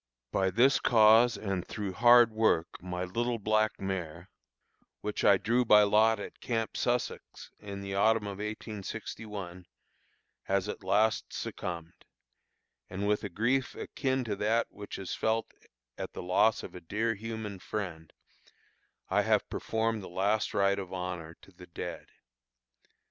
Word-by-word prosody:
By 95 0 +2
this 120 +8 +4
cause 115 +1 +5
and 95 -4 -2
through 100 -2 -5
hard 120 +2 +6
work 110 -7 +1
my 90 0 -4
little 115 +6 -1
black 110 0 +1
mare, 90 -2 -5 0.7
which 105 0 -3
I 100 - +6
drew 120 +5 +1
by 105 -3 +7
lot 110 +2 +4
at - - -8
Camp 115 -2 -2
Sussex 125 0 -2
in 100 -1 -7
the 100 0 -5
autumn 110 +2 +3
of 100 -1 -6
1861, 105 -3 -6 0.8
has 100 0 0
at 105 - -6
last 105 +4 +2
succumbed, 85 -1 -6 0.9
and, 100 +2 -3
with 105 0 +1
a 100 - -3
grief 120 +8 0
akin 130 -1 -2
to 110 -4 -3
that 110 +3 +2
which 105 0 -8
is 95 -3 -5
felt 110 0 -1 0.5
at - - -5
the - - -6
loss 95 +5 +3
of - - -8
a 90 - -9
dear 110 +7 -1
human 110 -2 -6
friend, 85 -6 -5 1.0
I - - +2
have - - +2
performed 110 -1 -1
the 95 - -9
last 100 +4 0
rite 100 0 +2
of 95 -2 -7
honor 90 -3 -5
to - - -16
the 90 0 -14
dead. 85 - -7
105 Hz, 150 wpm, -30 LUFS, 95-110 Hz, 1.0 s, by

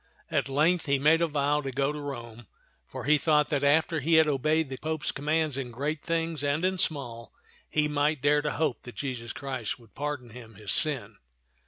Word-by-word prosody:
At 135 - 0
length 160 +5 +2
he 140 0 +3
made 155 +4 +4
a 170 - +3
vow 145 -1 +1
to 135 -2 -4
go 135 +2 0
to 150 - -6
Rome, 120 -5 -7 0.4
for - - -7
he 150 +2 +4
thought 150 0 +3
that 145 -2 0
after 160 +3 +3
he 160 +4 +2
had 160 0 +7
obeyed 155 +2 +1
the 130 - -5
Pope's 155 -2 -2
commands 150 -1 0
in 130 -2 -4
great 145 +6 -3
things 165 -2 -1
and 145 +5 +1
in 185 0 0
small, 120 - -2 0.4
he 150 -1 +1
might 150 0 +1
dare 145 +1 +4
to 150 - -2
hope 150 -5 -1
that 120 -3 -11
Jesus 120 -2 -4
Christ 130 -6 -4
would 115 -5 -20
pardon 145 -5 -4
him 115 -2 -12
his 105 0 -5
sin. 125 -10 +2
145 Hz, 205 wpm, -28 LUFS, 130-155 Hz, 0.4 s, had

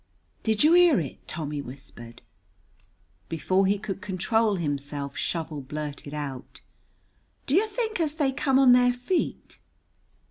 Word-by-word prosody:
"Did 220 +1 +2
you 310 +2 +6
hear 350 -5 +6
it?" 145 -6 -7
Tommy 150 -2 -4
whispered. 125 -3 -11 1.1
Before 185 +4 +1
he 200 +1 +2
could 195 -2 -6
control 210 +2 +1
himself 145 -3 -3
Shovel 160 -3 -3
blurted 145 +1 -6
out: 140 -4 -7 0.8
"Do 275 - -1
you 405 +7 +4
think 440 -1 -3
as 310 -2 0
they 290 -4 +1
come 265 0 +1
on 265 -2 +7
their 245 0 +5
feet?" 250 +9 -3
195 Hz, 135 wpm, -26 LUFS, -, 1.1 s, on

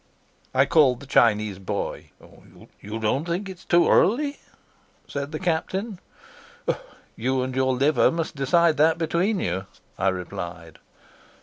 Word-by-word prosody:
I 130 +1 +4
called 135 -5 +4
the 140 - -11
Chinese 105 -6 +2
boy. 95 - -4 0.7
"You 105 +2 -6
don't 110 +6 0
think 180 +4 -2
it's 185 -2 -10
too 175 0 +3
early?" 280 +8 +3 0.7
said 140 +1 -4
the 155 - -3
Captain. 185 +4 -2 1.2
"You 130 +3 0
and 130 0 -4
your 130 0 +2
liver 135 -2 +3
must 165 -2 -3
decide 160 +4 +3
that 160 +2 +4
between 170 +5 0
you," 95 - -2 0.3
I 95 - +1
replied. 85 -3 -5
140 Hz, 130 wpm, -24 LUFS, 110-170 Hz, 1.2 s, I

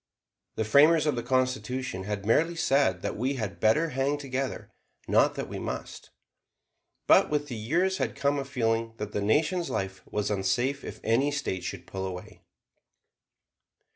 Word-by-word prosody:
The 110 - -1
framers 150 +8 +5
of 150 -3 +1
the 120 - -2
Constitution 130 -4 -1
had 100 -1 -4
merely 165 +10 +2
said 135 - +2
that - - -2
we 130 +5 -1
"had 110 -6 -4
better" 150 +10 +3
hang 135 +2 0
together, 135 -1 -4 0.4
not - - +3
that - - -4
we - - -6
"must." - - -6 1.0
But - - +5
with 145 -1 -1
the 120 - -4
years 170 - 0
had - - -1
come 140 0 +1
a 135 - -4
feeling 115 -4 -1
that 105 -1 -5
the 105 - -2
Nation's 155 - +1
life 95 -1 -3
was 105 0 -1
unsafe 120 +8 0
if - - -8
any 120 +6 +2
State 140 -10 -3
should - - -6
pull 95 0 -4
away. 90 -1 -8
130 Hz, 165 wpm, -28 LUFS, 105-145 Hz, 1.0 s, framers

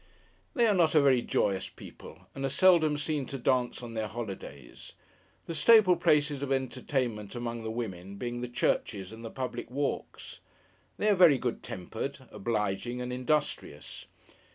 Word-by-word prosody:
They 240 -4 +4
are 215 - +4
not 170 -4 +3
a - - +8
very 130 -3 +4
joyous 95 -4 0
people, - - -13
and 135 - -6
are 135 - +1
seldom 160 -1 +4
seen 145 -2 -2
to 135 - -5
dance 125 -1 0
on 115 -1 -7
their 110 -1 -2
holidays: 100 - -8 0.5
the 165 - -5
staple 205 +1 +6
places 145 -3 +2
of 140 -1 -3
entertainment 125 -5 -2
among 120 -1 -4
the 110 - -4
women, 100 -5 -5
being 120 +3 -4
the 125 - -3
churches 105 -5 -1
and 115 +1 -10
the 115 - -5
public 130 0 -5
walks. 140 +3 -4 0.6
They 210 - 0
are 210 - +6
very 175 -7 +6
good 125 -2 -3
tempered, 125 +8 -6
obliging, 105 +2 -2
and 125 0 -4
industrious. 130 - -2
125 Hz, 160 wpm, -29 LUFS, 110-145 Hz, 0.6 s, a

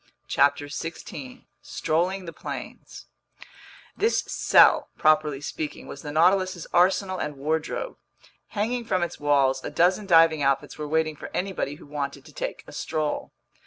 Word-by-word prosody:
CHAPTER 145 +1 +2
16 145 -3 -7 0.2
Strolling 180 +4 -1
the 165 - -7
Plains - - -8 0.9
THIS 445 +3 +2
CELL, - - +4
properly 155 -2 +3
speaking, 150 0 -5
was 140 - -9
the 150 - -6
Nautilus's 185 +2 +2
arsenal 185 +1 +3
and 150 -2 -4
wardrobe. 160 - -2 0.5
Hanging 235 +4 -2
from 185 -5 0
its 175 - -4
walls, 135 -2 +2
a - - -3
dozen 180 +7 +2
diving 165 -3 +5
outfits 140 +1 0
were 150 -1 -5
waiting 155 0 0
for - - -8
anybody 185 -6 -2
who - - -14
wanted 145 -1 -5
to - - -15
take - - -5
a - - -12
stroll. 155 -2 -3
155 Hz, 145 wpm, -25 LUFS, 145-185 Hz, 0.9 s, diving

